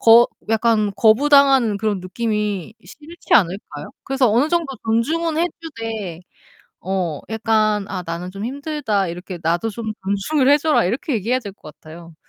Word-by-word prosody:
거 230 +1 +7 0.2
약간 220 -2 +2
거부당하는 265 -1 +4
그런 210 -1 -1
느낌이 210 +1 -3
싫지 315 +3 -4
않을까요? 175 -6 0
그래서 270 -3 +2
어느 245 +8 +2
정도 340 -1 +1 0.2
존중은 310 +9 0
해 345 +2 +2
주되 225 - -6 0.6
어 180 -5 -2
약간 215 -2 +1
"아 185 -2 -4
나는 170 +2 -5
좀 200 +2 -7
힘들다. 270 -5 -2
이렇게 180 +2 -7
나도 170 +7 0
좀 220 0 -5
존중을 230 +9 +1
해 290 - +6
줘라." 305 +1 +2
이렇게 270 - -2
얘기해야 230 +3 0
될 205 -5 -9
것 155 -6 -14
같아요. 165 +1 -13
220 Hz, 320 characters per minute, -20 LUFS, 195-270 Hz, 0.6 s, 거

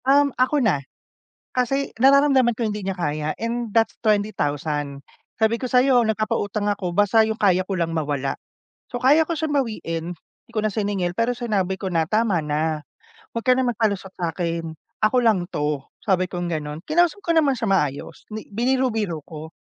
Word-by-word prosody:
Um, 280 0 +4
ako 260 +1 +2
na. 175 -10 +2 0.7
Kasi 270 +2 0
nararamdaman 270 -3 +5
ko 235 - -1
hindi 210 -1 -3
niya 190 -1 -3
kaya, 150 -2 -2
and 235 0 -3
that's 225 +2 +2
20,000. 150 - -1 0.3
Sabi 225 +1 +1
ko 255 - -3
sa'yo 250 0 +4
nagpapautang 215 -2 -1
ako 200 -3 -1
basta 205 +2 +5
yung 220 0 0
kaya 185 -4 +3
ko 190 -1 -3
lang 165 -1 -1
mawala. 145 -4 -1 0.6
So, 245 - -4
kaya 295 +5 +5
ko 335 - -1
siyang 305 -1 -1
bawiin, 165 -9 -4
hindi - - -29
ko 215 - 0
na 215 0 0
siningil. 200 -4 -1
Pero 230 +2 +2
sinabi 205 -6 0
ko 190 - -4
na 165 -3 +1
tama 215 -5 +2
na, 155 +1 -1 0.5
huwag 230 - -4
ka 255 - +6
na - - +3
magpalusot 210 -5 0
sa'kin. 165 -1 -3 0.3
Ako 235 +4 +3
lang 200 -6 +3
'to 150 -5 -2 0.2
sabi 185 -2 +1
kong 175 -2 -3
gano'n, 150 -1 -4
kinausap 345 +4 +2
ko 335 - +2
naman 305 -4 +4
siya 230 - -2
maayos, 150 -8 -1
'di 215 0 -7
biniro-biro 225 -7 0
ko. 160 0 -9
210 Hz, 175 wpm, -23 LUFS, 165-240 Hz, 0.7 s, ka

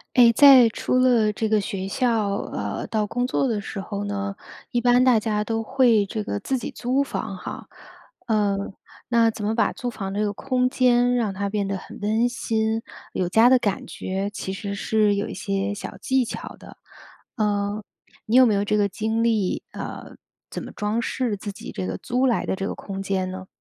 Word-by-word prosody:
哎， 240 -2 +8
在 265 -1 +8
出 250 +3 -1
了 240 -4 +4
这 220 +1 -2
个 215 -1 +3
学 195 -2 -4
校， 225 -4 +1 0.2
呃， - - -3
到 215 -1 0
工 245 +4 -1
作 265 +1 0
的 220 -3 -1
时 200 0 -6
候 200 +1 -4
呢， 200 -1 -3 0.3
一 240 - 0
般 245 +1 +4
大 255 -3 +5
家 215 -1 -1
都 225 +1 -2
会 230 -3 +3
这 215 +2 -3
个 100 - -3
自 265 - -2
己 245 - -5
租 255 +3 0
房 220 -7 -4
哈。 180 - -7 0.6
呃， 210 -2 +2 0.5
那 230 -1 +4
怎 210 - -6
么 220 +2 0
把 - - +2
租 245 - -4
房 195 -4 -5
这 210 +1 0
个 205 - -1
空 255 +3 0
间 245 -1 +3
让 215 -5 0
它 200 +1 -2
变 205 -1 -1
得 195 0 -2
很 - - -10
温 220 +4 +2
馨、 225 -3 -1 0.3
有 180 - -1
家 225 +6 +5
的 260 - +6
感 205 -5 -1
觉， 195 +2 -3
其 190 -2 -5
实 200 +1 -5
是 210 -1 +2
有 205 - -1
一 - - -6
些 195 0 -2
小 205 - -7
技 260 -1 +1
巧 230 - -6
的， - - -13 0.6
呃， 205 -1 -1 0.4
你 225 - +2
有 255 0 +8
没 220 - +3
有 200 0 +1
这 210 +1 +1
个 205 -1 +2
经 220 +3 -1
历？ 215 -5 0
呃， - - -7 0.3
怎 - - -6
么 - - -8
装 210 +3 -2
饰 245 -4 -1
自 205 +1 -6
己 200 - -9
这 95 -1 -4
个 - - -4
租 250 +2 -1
来 240 - 0
的 - - 0
这 195 - -4
个 - - -5
空 195 -1 -6
间 190 -1 -1
呢？ 185 0 -7
215 Hz, 225 characters per minute, -24 LUFS, 200-240 Hz, 0.6 s, 哎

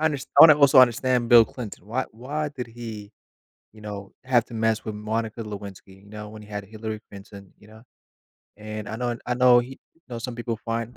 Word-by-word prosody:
Unders 150 -4 0
I - - +10
wanna 155 -2 +9
also 140 -2 +6
understand 125 0 +2
Bill 120 -1 +8
Clinton. 110 -6 -9
Why 125 +4 -2
why 145 +6 -4
did 125 -4 -7
he, 110 -3 -9 0.6
you 110 - -16
know, 100 -2 -8
have 125 -3 +2
to 120 - -14
mess 110 -1 0
with 110 -1 -5
Monica 110 +1 -3
Lewinsky, 100 -2 -9
you - - -17
know, 105 0 -8
when 110 0 -11
he 105 - -14
had 105 -1 -6
Hillary 110 +1 -7
Clinton, 100 -1 -13
you 105 - -19
know? 110 +2 -16 0.7
And 110 0 -7
I 110 - -5
known 120 0 -2
and 115 - -8
I 125 - 0
know 125 -1 +6
he 125 +2 -8 0.2
you 165 - -32
know, 120 -2 -6
some 120 0 -6
people 120 -1 -3
find 115 +1 -4
115 Hz, 220 wpm, -24 LUFS, 105-125 Hz, 0.7 s, I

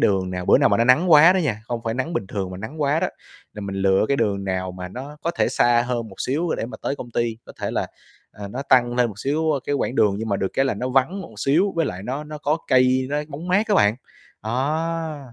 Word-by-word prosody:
đường 95 -2 +1
nào 90 -1 -4
bữa - - +6
nào - - +4
mà 100 - +3
nó 115 - +2
nắng 155 +9 +4
quá 160 +4 +8
đó 190 - +1
nha, 125 - -1
không 120 0 -4
phải 115 0 -1
nắng 130 +7 -3
bình 160 - -2
thường 95 -1 -4
mà 90 - -7
nắng 145 +10 -5
quá 145 +3 +2
đó, - - +1 0.5
là 105 - -7
mình 100 -1 -5
lựa 95 0 +3
cái 140 - +2
đường 100 -4 0
nào 95 -1 -2
mà 90 0 -7
nó 135 +9 -8
có 170 - 0
thể 170 - 0
xa 120 -1 +3
hơn 120 -3 -2
một 95 - -14
xíu 155 +7 -1
để - - -3
mà 125 - -8
tới 140 - -2
công 120 - -8
ty, 115 -1 -1
có - - -11
thể - - -2
là, - - -1 0.5
à, 100 -1 -8
nó 125 +7 -5
tăng 120 -1 +4
lên 125 -1 +2
một 105 -2 -10
xíu 145 +8 -1 0.2
cái 145 - 0
quãng 130 -2 -1
đường 105 -5 +3
nhưng 110 +1 -4
mà 100 - +1
được 95 - -1
cái 135 - +2
là 135 - 0
nó 125 +5 -3
vắng 135 +9 +1
một 115 - -12
xíu 170 - +2
với 165 - +2
lại 90 +1 -5
nó 135 +6 -4
nó 150 0 -8
có 150 +2 0
cây, 130 0 +3
nó 145 - 0
bóng 155 +4 -7
mát 200 +5 +2
á 205 - +3
bạn. 105 - +4 0.5
Đó, 150 +3 -2
125 Hz, 280 wpm, -22 LUFS, 105-150 Hz, 0.5 s, quá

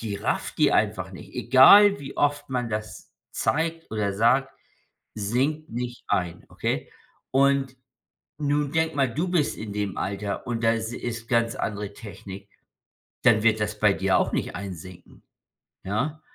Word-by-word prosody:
die 110 -3 -4
rafft 100 - -2
die - - +3
einfach - - 0
nicht. - - -12
Egal, 200 +12 +7
wie 140 -1 -9
oft 145 0 0
man 125 -3 -2
das 105 0 -6 0.2
zeigt 165 +2 -1
oder 105 -2 -1
sagt, 125 +6 +3 0.6
sinkt 130 +9 -1
nicht 120 +1 -5
ein, 85 -1 -1
okay? - - -3 0.4
Und 135 -1 +2 0.6
nun 145 -1 0
denke 160 0 +1
mal, 135 -4 +1
du 165 +8 -1
bist 170 -5 0
in 110 -2 -6
dem 100 -3 -3
Alter. 100 +1 -3
Und 115 -1 -3
das 115 0 +1
is - - -7
ist 120 -1 -5
ganz 115 -2 +1
andere 105 -1 -4
Technik. 100 -2 -10 0.7
Dann 115 -4 +5
wird 110 -1 +3
das 105 0 -3
bei 105 -1 +4
dir 95 -1 +2
auch - - -1
nicht - - -2
einsinken. 95 -2 -9 0.6
Ja? 135 +11 -2
115 Hz, 155 wpm, -25 LUFS, 105-140 Hz, 0.7 s, Egal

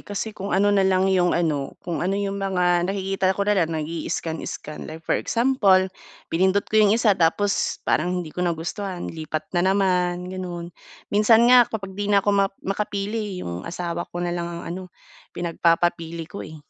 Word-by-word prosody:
Kasi 205 +2 -5
kung 200 -1 -6
ano 205 +1 +3
na 200 - +4
lang 190 -1 +3
'yong 180 -1 +3
ano 150 -5 -1
kung 170 -3 -3
ano 190 +3 0
'yong 200 0 -2
mga 180 -2 +1
nakikita 195 -1 0
ko 200 - 0
na 210 - +2
lang, 165 -5 +1
nag-ii-scan-scan. 160 -1 -4
Like 160 +1 -9
for - - 0
example, 205 -7 +2 0.4
pinindot 190 +4 +2
ko 215 - +2
'yong 210 0 +5
isa 225 -3 +4
tapos 195 +4 0
parang 180 +2 0
hindi 155 - -10
ko - - -5
nagustuhan, 175 +2 -3
lipat 155 -1 -4
na 175 - +2
naman, 180 -2 +1
gano'n. 175 -2 -6 0.4
Minsan 225 +3 +5
nga 245 -2 +7
kapag 195 -3 -5
'di 205 +1 -3
na 200 -1 +3
ako 205 - +3
ma 200 -1 +4 0.2
makapili, 205 +1 -2
eh, - - -6
'yong 85 +1 -5
asawa 175 0 -4
ko 175 0 -4
na 175 - -1
lang 170 0 -3
ang 170 0 -6
ano, 185 +2 -5 0.5
pinagpapapili 170 -1 0
ko, 190 +5 -9
eh. 155 - -8
185 Hz, 185 wpm, -23 LUFS, 170-200 Hz, 0.5 s, nga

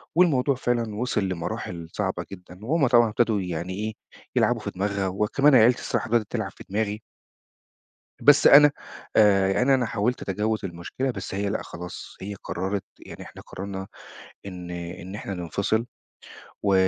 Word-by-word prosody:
والموضوع 145 -6 +3
فعلًا 120 -4 -1
وصل 110 -2 -1
لمراحل 85 -1 -4
صعبة 95 -3 -2
جدًا 90 -1 -11
وهُم 145 +2 +2
طبعًا 120 -2 +5
ابتدوا 110 -1 +1
يعني 90 0 -4
إيه 110 +3 -3 0.4
يلعبوا - - +3
في - - -4
دماغها، 100 0 -1
وكمان 105 +9 +3
عيلتي 120 +1 +6
الصراحة - - -2
بدأت 115 -2 +2
تلعب - - -2
في - - -13
دماغي. 105 +1 -1 1.2
بس 145 +3 +7
أنا 145 +1 +9 0.4
آآ 100 -3 +5
يعني 125 +8 +3
أنا 130 -2 +2
حاولت 115 +2 -1
أتجاوز 105 +2 -1
المشكلة، 90 +9 -3
بس 95 -5 -6
هي 100 +1 -1
لأ 105 - -2
خلاص، 90 +1 -9
هي 100 +2 -5
قررت 95 +2 -2 0.2
يعني - - -9
إحنا - - -12
قررنا 95 0 -7 0.6
إن 90 -2 -7
إن 90 +2 -7
إحنا 100 -2 -5
ننفصل. 100 +5 -1 0.8
و 100 -1 +3
105 Hz, 155 wpm, -25 LUFS, 95-120 Hz, 1.2 s, أنا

